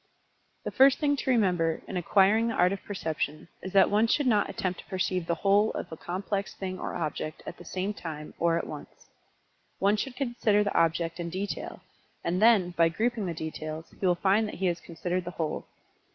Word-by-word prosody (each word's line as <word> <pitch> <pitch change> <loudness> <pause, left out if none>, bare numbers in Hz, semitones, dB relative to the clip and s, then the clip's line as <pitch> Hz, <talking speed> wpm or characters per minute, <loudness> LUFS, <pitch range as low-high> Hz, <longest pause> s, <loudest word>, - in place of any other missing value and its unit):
The - - -3
first 270 0 +6
thing 285 -2 +2
to 265 - -3
remember 180 -9 +2
in - - -6
acquiring 200 +5 +3
the 230 - -1
art 180 +2 +3
of 195 - -6
Perception 160 -5 -3
is 190 - -6
that 195 0 +5
one 215 +2 +4
should 290 +5 +2
not 215 -5 +3
attempt 185 -2 -3
to - - -11
perceive 185 -3 -1
the 170 - +1
whole 200 +5 +3
of 175 - -5
a - - -5
complex 195 +4 -3
thing 185 -1 -5
or - - -4
object 155 -1 -4
at 175 - -7
the 175 - -12
same 190 +4 -2
time, 155 -6 -7
or 165 0 +3
at - - -2
once. - - -10 0.7
One 200 +2 +3
should 250 +3 -3
consider 235 -6 +1
the 205 - -2
object 165 +1 +1
in 170 0 -3
detail, 190 +4 -4 0.4
and 180 +3 0
then, 215 -6 +5
by 165 -1 +3
grouping 220 +3 -1
the 170 - -3
details, 155 0 -6
he - - -11
will 180 -2 +4
find 200 +4 +2
that - - -6
he 190 - -2
has 170 -2 +1
considered 175 +2 -3
the 175 - -5
whole. 160 -2 -3
185 Hz, 210 wpm, -28 LUFS, 170-210 Hz, 0.7 s, first